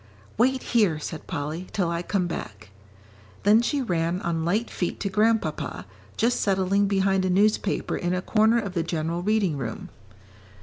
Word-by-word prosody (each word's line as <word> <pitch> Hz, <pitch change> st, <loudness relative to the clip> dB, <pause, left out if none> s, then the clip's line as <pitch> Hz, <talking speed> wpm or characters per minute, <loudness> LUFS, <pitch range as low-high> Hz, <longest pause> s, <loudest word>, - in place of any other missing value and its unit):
"Wait 260 Hz, +3 st, +2 dB
here," 205 Hz, -10 st, +2 dB
said 155 Hz, +1 st, -7 dB
Polly, 155 Hz, +5 st, -4 dB
"till 185 Hz, -4 st, +1 dB
I 170 Hz, 0 st, -1 dB
come 180 Hz, 0 st, -1 dB
back." 105 Hz, -, -7 dB, 0.7 s
Then 210 Hz, +3 st, +6 dB
she 275 Hz, +3 st, 0 dB
ran 170 Hz, -4 st, 0 dB
on 165 Hz, -1 st, -1 dB
light 205 Hz, +8 st, 0 dB
feet 175 Hz, -, -3 dB
to 200 Hz, -, -2 dB
Grandpapa, 190 Hz, -, 0 dB, 0.3 s
just 235 Hz, +2 st, +1 dB
settling 195 Hz, 0 st, +2 dB
behind 195 Hz, -1 st, +2 dB
a 185 Hz, -, 0 dB
newspaper 205 Hz, +2 st, +1 dB
in 175 Hz, +1 st, -1 dB
a 180 Hz, -, -1 dB
corner 220 Hz, +2 st, +3 dB
of 200 Hz, -5 st, -2 dB
the 170 Hz, -, 0 dB
general 165 Hz, +1 st, -2 dB
reading 200 Hz, -5 st, +1 dB
room. 115 Hz, -4 st, -5 dB
185 Hz, 165 wpm, -25 LUFS, 165-210 Hz, 0.7 s, Then